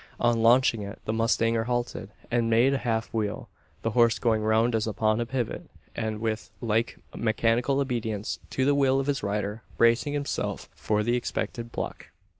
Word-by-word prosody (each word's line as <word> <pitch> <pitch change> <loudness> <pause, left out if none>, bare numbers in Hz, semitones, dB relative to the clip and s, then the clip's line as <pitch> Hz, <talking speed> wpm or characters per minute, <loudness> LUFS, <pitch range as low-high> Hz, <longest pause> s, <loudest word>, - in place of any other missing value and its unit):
On 120 -1 +2
launching 115 -1 +4
it, 100 +1 -6
the 110 - -1
mustanger 115 0 +1
halted, 120 -4 -2 0.2
and 120 -1 +2
made 120 +4 +4
a 135 - 0
half 115 -2 -2
wheel 105 -2 -2 0.3
the 115 - 0
horse 115 -1 +4
going 110 -3 +1
round 110 +2 +2
as 110 0 0
upon 110 +1 +1
a 120 - -2
pivot; 125 -2 -3 0.3
and 110 -2 -2
with 110 0 -2
like 115 0 0 0.2
mechanical 115 +4 +1
obedience 115 -6 -2
to 130 - 0
the 145 - +4
will 135 -1 +3
of 135 - -1
his 145 -1 0
rider, 105 +2 -2 0.2
bracing 115 +5 +3
himself 145 -1 -3
for 105 0 0
the 120 +2 +1
expected 120 -1 -3
pluck. - - -5
115 Hz, 175 wpm, -27 LUFS, 110-120 Hz, 0.3 s, launching